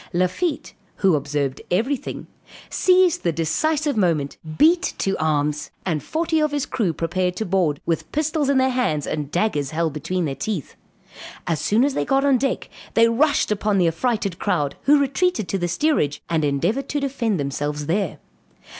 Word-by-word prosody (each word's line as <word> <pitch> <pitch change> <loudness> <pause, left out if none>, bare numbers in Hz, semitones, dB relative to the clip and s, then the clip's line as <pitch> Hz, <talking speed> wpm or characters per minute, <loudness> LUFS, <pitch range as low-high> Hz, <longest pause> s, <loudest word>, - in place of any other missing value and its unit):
Lafitte, 185 - -1 0.2
who 190 -3 +3
observed 140 -2 -2
every 235 +10 +1
thing, - - -7 0.5
seized 365 -2 +3
the 170 - +1
decisive 285 - 0
moment, 165 -9 0 0.2
beat 340 +4 +4
to 195 0 0
arms, 150 -1 0 0.2
and 160 -5 -1
forty 320 - 0
of 305 0 +2
his 290 -2 -1
crew 225 -9 0
prepared 180 +3 -1
to 220 - -3
board, 175 -6 +1
with 165 -1 -2
pistols 305 -1 0
in 280 - +3
their 260 0 +3
hands 160 - 0
and 150 -2 -3
daggers 155 -5 0
held 160 -1 -1
between 165 +4 -2
their 140 - -2
teeth. 195 - -4 0.7
As 160 -4 -1
soon 225 +5 +3
as 285 - 0
they - - 0
got 270 0 +1
on 270 -3 +4
deck, 270 +2 -1 0.3
they 230 0 +6
rushed 285 +1 +2
upon 210 0 +1
the 180 -3 +3
affrighted 200 +1 -1
crowd, 145 -1 0
who 290 +2 +6
retreated 280 - 0
to 195 - -1
the 175 - 0
steerage, 175 - 0
and 160 -2 +1
endeavored 175 - 0
to 290 - -1
defend 240 - -1
themselves 145 +1 -3
there. 180 +2 -1
195 Hz, 175 wpm, -22 LUFS, -, 0.7 s, they